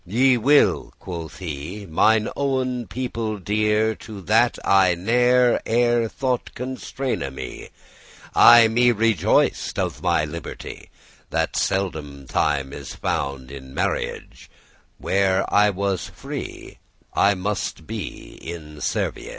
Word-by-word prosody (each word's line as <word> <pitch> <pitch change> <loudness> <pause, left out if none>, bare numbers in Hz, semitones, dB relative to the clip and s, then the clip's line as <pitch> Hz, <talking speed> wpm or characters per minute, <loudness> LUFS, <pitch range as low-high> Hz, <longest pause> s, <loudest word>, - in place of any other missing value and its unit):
"Ye 125 +8 +3
will," 140 +5 +3
quoth 85 -3 -7
he, 90 +3 -6
"mine 110 +7 +3
owen 130 -3 -1
people 115 -4 -3
dear, 105 +3 +1
To 105 -3 -9
that 115 +5 +3
I 95 -2 +4
ne'er 125 +6 +3
ere* 120 0 +2
thought 130 -1 -2
constraine 130 +1 -4 0.2
me. - - -7
*before - - -23
I 120 -1 +8
me 120 +2 +3
rejoiced 110 -5 +1
of - - -2
my 85 -3 +2
liberty, 85 +3 -8 0.4
That - - -1
seldom 75 -8 -2
time 70 0 0
is 70 -2 -8
found 70 -1 -3
in 65 -1 -10
rnarriage; - - -3 0.5
Where 95 0 +1
I 105 0 +5
was 100 -1 -2
free, - - -8 0.3
I 100 0 +3
must 100 +2 -3
be - - -7
in 80 -2 -8
servage! - - -2
105 Hz, 120 wpm, -23 LUFS, 85-120 Hz, 0.5 s, I